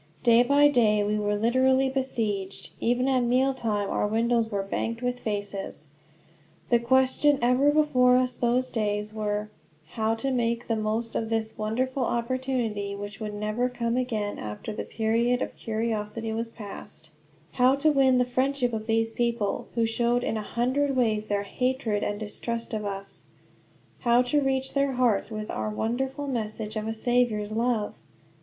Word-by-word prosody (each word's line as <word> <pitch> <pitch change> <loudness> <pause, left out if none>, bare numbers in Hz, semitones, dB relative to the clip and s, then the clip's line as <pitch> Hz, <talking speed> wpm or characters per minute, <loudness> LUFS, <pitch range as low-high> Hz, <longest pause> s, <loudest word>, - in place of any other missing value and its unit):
Day 235 -1 +6
by 285 +4 +5
day 215 -7 +3
we 210 +1 0
were 205 0 0
literally 260 +4 +3
besieged. 220 -8 -2
Even 245 +2 +1
at 265 -1 +3
meal 255 +3 +2
time 215 -5 -1
our - - +1
windows 230 +1 +1
were 200 -3 -1
banked 230 +4 -3
with 245 0 -1
faces. 200 -8 -4 0.8
The 240 - +4
questions 260 +4 +3
ever 250 +4 +4
before 275 -5 +4
us 255 -1 +1
those 245 +2 +1
days 210 -1 -1
were 210 -1 -2 0.4
how 220 0 0
to 270 +4 -2
make 235 -1 0
the 225 - 0
most 220 +1 -2
of 225 - -2
this 220 -1 -1
wonderful 255 +5 -1
opportunity, 235 -4 -1
which 205 0 -7
would 210 -2 -5
never 215 +4 -1
come 235 -1 -2
again 220 -5 -2
after 105 - -6
the - - -5
period 230 +2 +1
of - - -6
curiosity 220 0 -3
was 230 +1 -3
past; 200 -7 -10 0.4
how 255 +2 +4
to 305 +2 +3
win 265 -3 +4
the 250 - +3
friendship 255 0 0
of 220 0 -4
this 225 0 +1
people, 235 -3 -1
who 230 -1 +2
showed 235 +2 +1
in - - -1
a 215 - -2
hundred 260 +6 0
ways 215 -4 +1
their 205 -1 0
hatred 250 -1 -1
and 205 0 -2
distrust 230 +2 -5
of 215 -1 -2
us; 195 0 -7 0.7
how 240 0 +4
to 290 +4 +1
reach 265 -1 -1
their 275 -1 +1
hearts 245 -6 +2
with 215 -1 -5
our - - -2
wonderful 260 +6 -2
message 220 -4 -4
of 215 0 -3
a 225 - -1
Saviour's 225 -3 +1
love? 225 -1 -1
230 Hz, 165 wpm, -27 LUFS, 215-255 Hz, 0.8 s, Day